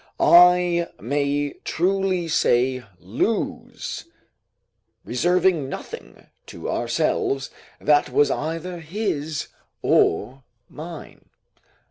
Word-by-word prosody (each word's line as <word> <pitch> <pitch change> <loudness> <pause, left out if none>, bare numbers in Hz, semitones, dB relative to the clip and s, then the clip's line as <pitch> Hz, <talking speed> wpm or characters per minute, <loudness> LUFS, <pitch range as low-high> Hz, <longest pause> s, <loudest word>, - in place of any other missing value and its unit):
I 175 -1 +5
may 145 +4 -1
truly 185 0 0
say 130 -4 +2 0.2
lose, - - -3 1.0
reserving 175 +2 +1
nothing - - -9 0.2
to - - -6
ourselves 135 +2 -1 0.3
that 145 -1 +3
was 145 - +3
either 165 +3 -3
his 160 -4 -3 0.3
or 130 +11 +2 0.3
mine. 160 +2 -10
155 Hz, 75 wpm, -23 LUFS, 140-175 Hz, 1.0 s, I